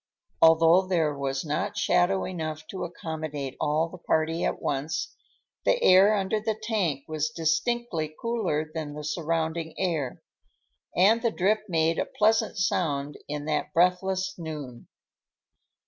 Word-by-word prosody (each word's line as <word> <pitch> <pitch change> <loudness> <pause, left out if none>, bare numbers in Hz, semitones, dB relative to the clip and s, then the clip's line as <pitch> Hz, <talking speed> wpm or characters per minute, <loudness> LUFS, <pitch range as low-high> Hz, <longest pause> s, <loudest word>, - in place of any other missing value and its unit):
Although 165 +3 +6
there 160 -5 +1
was 135 +1 -2
not 200 +7 -2
shadow 190 -1 +2
enough 155 -3 -5
to 190 - -5
accommodate 155 -5 -5
all 155 +2 +1
the 180 +2 -11
party 160 0 0
at - - -1
once, 145 +3 -2 0.5
the - - +3
air 195 +3 +7
under 200 +2 0
the 215 0 -2
tank 200 - -1
was 155 0 -1
distinctly 160 +2 -1
cooler 205 -10 -1
than 155 -3 -5
the 150 - -6
surrounding 160 0 -2
air, 160 -9 -2 0.7
and 210 +6 +5
the 235 - +2
drip 215 +1 +1
made 165 -1 +1
a - - +1
pleasant 220 0 +2
sound 150 -6 -1
in 145 0 -4
that 155 - -1
breathless 185 +2 +2
noon. 150 -7 -7
165 Hz, 135 wpm, -27 LUFS, 155-190 Hz, 0.7 s, air